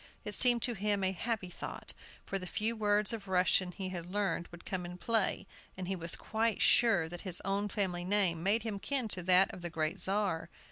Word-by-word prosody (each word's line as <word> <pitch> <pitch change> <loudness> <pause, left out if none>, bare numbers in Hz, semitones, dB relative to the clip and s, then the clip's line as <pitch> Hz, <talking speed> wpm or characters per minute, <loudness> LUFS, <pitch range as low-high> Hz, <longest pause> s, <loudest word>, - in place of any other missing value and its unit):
It - - -3
seemed 240 -2 +4
to 245 - +2
him 205 -1 0
a 190 - +2
happy 195 -1 -3
thought, - - -5 0.3
for 195 - -1
the 185 - -7
few 220 +5 -1
words 210 0 +2
of 210 -3 -6
Russian 185 0 +2
he 190 0 -5
had 175 -2 -6
learned 195 -4 -1
would 175 0 -13
come 185 -2 -3
in 175 0 -7
play, 220 +1 +1 0.3
and 185 -1 -5
he 190 - -1
was 170 -1 0
quite 220 0 -1
sure 200 -9 +4
that 175 +1 -7
his 180 -3 +2
own 200 +1 0
family 185 -4 -2
name 185 -3 +2
made 205 +5 +2
him 215 -3 -4
kin 265 +1 -2
to 185 - +4
that 185 +2 +4
of 180 - -9
the 175 - -4
great 160 -1 -2
Czar. 195 -4 -1
195 Hz, 220 wpm, -32 LUFS, 180-210 Hz, 0.3 s, seemed